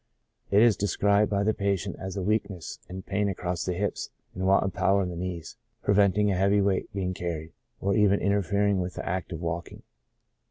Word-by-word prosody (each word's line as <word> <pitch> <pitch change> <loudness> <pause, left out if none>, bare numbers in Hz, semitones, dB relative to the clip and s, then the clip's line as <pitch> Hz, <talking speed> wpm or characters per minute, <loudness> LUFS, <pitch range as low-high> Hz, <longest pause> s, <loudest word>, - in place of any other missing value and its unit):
It 100 +2 +5
is 115 -3 +5
described 100 +1 +2
by 100 -1 +1
the 110 +1 +2
patient 100 -4 -1
as 95 +1 -5
a 95 - -2
weakness 100 -4 -2
and 95 +1 -7
pain 100 +1 0
across 90 -2 -3
the 90 - -1
hips, 100 +3 -2 0.2
and 95 +1 -2
want 95 0 +4
of 95 - -2
power 100 0 +2
in 90 - -3
the 90 - -6
knees, 85 +2 -5 0.3
preventing 100 0 +3
a - - +1
heavy 100 +2 +3
weight 100 0 0
being 95 -3 -2
carried, 85 -3 -4 0.3
or 100 0 +1
even 100 -2 +4
interfering 100 0 +1
with 90 0 -3
the - - -5
act 95 +1 -2
of 80 -1 -5
walking. 85 0 -4
95 Hz, 200 wpm, -27 LUFS, 90-100 Hz, 0.3 s, It